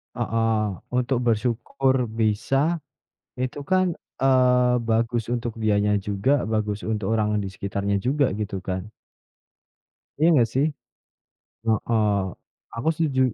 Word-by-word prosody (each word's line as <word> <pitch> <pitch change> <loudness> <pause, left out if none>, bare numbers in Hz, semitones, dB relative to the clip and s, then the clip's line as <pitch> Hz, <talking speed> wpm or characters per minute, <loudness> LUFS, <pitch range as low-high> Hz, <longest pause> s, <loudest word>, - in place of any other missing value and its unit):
Heeh, 115 -1 +1 0.3
untuk 125 0 +1
bersyukur 125 +3 +1
bisa, 115 +9 +1 0.6
itu 130 +3 -3
kan, 185 -1 +1 0.2
eee, 125 -2 +4
bagus 115 +1 0
untuk 120 -1 -3
dianya 105 -1 +2
juga, 105 +8 +1
bagus 105 -1 -2
untuk 105 -2 -2
orang 105 -1 +1
di 100 - -3
sekitarnya 100 +1 -2
juga, 135 +6 +1
gitu 100 -3 -3
kan. 95 +3 -5 1.3
Iya, 160 - +4
nggak 120 -6 +4
sih? 135 +3 +3 1.0
Heeh. 110 0 +1 0.7
Aku 115 +7 -2
setuju. 150 -5 0
115 Hz, 110 wpm, -24 LUFS, 105-130 Hz, 1.3 s, eee